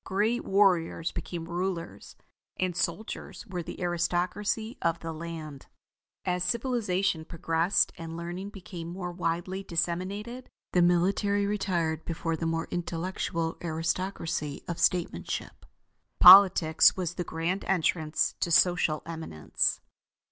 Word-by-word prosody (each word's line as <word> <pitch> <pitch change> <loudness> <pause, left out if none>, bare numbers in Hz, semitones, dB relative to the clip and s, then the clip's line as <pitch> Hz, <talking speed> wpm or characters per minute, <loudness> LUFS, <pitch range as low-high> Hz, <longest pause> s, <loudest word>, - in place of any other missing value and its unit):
Great 215 +5 0
warriors 180 -4 +2
became 170 -1 -5
rulers, 175 0 -4 0.4
and 185 -2 0
soldiers 185 +8 -4
were 185 -5 -4
the - - -8
aristocracy 180 +6 -1
of 165 - +1
the 165 -1 -5
land. 155 -3 -7 0.6
As 180 -1 0
civilization 200 -6 0
progressed 165 +3 +1
and 165 0 -6
learning 175 +4 -5
became 180 -4 -8
more 180 +1 -5
widely 175 +2 -2
disseminated, 195 +8 -3 0.2
the 180 - +4
military 195 +4 +2
retired 175 -6 -1
before 165 0 -2
the 165 +1 -2
more 165 0 -1
intellectual 170 -1 -3
aristocracy 165 -2 -2
of 170 - -3
statemanship. 170 - -1 0.5
Politics 180 -4 +8
was 180 -2 -2
the 175 - -3
grand 170 +4 -2
entrance 160 -3 +1
to - - 0
social 170 -2 +3
eminence. 160 - -2
175 Hz, 115 wpm, -28 LUFS, 165-190 Hz, 0.6 s, Politics